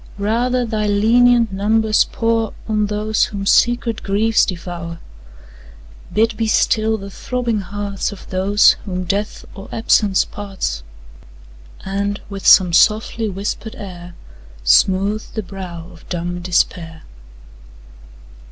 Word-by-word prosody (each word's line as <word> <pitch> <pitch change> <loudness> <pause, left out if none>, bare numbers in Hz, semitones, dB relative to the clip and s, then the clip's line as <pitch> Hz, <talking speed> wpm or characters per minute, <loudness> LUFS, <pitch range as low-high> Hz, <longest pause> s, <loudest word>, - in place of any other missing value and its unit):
Rather 240 +5 0
thy 215 -2 -2
lenient 230 +2 +4
numbers 215 +2 +2
pour 225 -1 -1
On 215 -1 0
those 210 +1 0
whom 200 -1 -6
secret 235 +1 +2
griefs 215 +3 +2
devour; 170 -2 -6 1.1
Bid 225 +1 +1
be 225 0 -1
still 220 0 +2
the 200 -1 -9
throbbing 235 0 -2
hearts 200 +1 -4
Of 205 - -11
those, 195 +3 +4
whom 185 -2 -3
death, 200 +4 -3
or 195 - -11
absence 210 -3 +2
parts, 195 - -5 1.0
And, 200 +1 -2
with 195 -1 -4
some 180 -3 +7
softly 215 +3 +2
whisper'd 205 +3 -5
air, 175 -3 -10 0.5
Smooth 190 - +3
the 220 - -2
brow 175 -3 -8
of 165 - -17
dumb 175 0 -3
despair. 165 -2 -1
205 Hz, 115 wpm, -19 LUFS, 185-220 Hz, 1.1 s, some